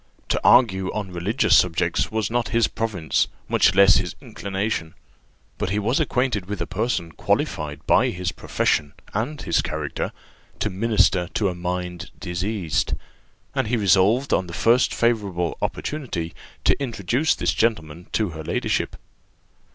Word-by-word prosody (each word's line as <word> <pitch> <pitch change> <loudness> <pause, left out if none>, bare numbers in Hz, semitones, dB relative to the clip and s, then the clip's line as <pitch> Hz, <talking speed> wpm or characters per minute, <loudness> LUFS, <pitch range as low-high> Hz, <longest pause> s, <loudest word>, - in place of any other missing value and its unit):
To - - +1
argue 95 -7 +5
on 100 -3 -4
religious 105 +6 +2
subjects 85 0 +2
was 110 -1 -1
not 120 0 0
his 115 0 +2
province, 100 -8 0 0.2
much - - +3
less 100 0 +7
his - - -2
inclination; 95 -2 -3 0.6
but - - -1
he 100 - 0
was 115 +8 +1
acquainted 125 - 0
with 105 0 -4
a - - -1
person 95 -6 -2
qualified 75 -2 -2
by - - +4
his 90 0 -3
profession 75 -4 0 0.2
and 125 +9 -2
his 85 - +2
character 75 -2 -3 0.5
'to 105 - -1
minister 100 -3 +2
to 100 -3 +2
a - - -3
mind 90 0 -4
diseased,' 90 -1 -1 0.6
and - - 0
he 120 +2 +1
resolved 105 - +3
on 90 - +1
the 85 - -8
first 120 +7 +3
favourable 100 -8 0
opportunity 105 - -3 0.3
to - - +4
introduce 125 - 0
this - - 0
gentleman 85 -7 -1
to 110 -3 +1
her 80 -1 -7
ladyship. - - -1
100 Hz, 145 wpm, -23 LUFS, 85-115 Hz, 0.6 s, less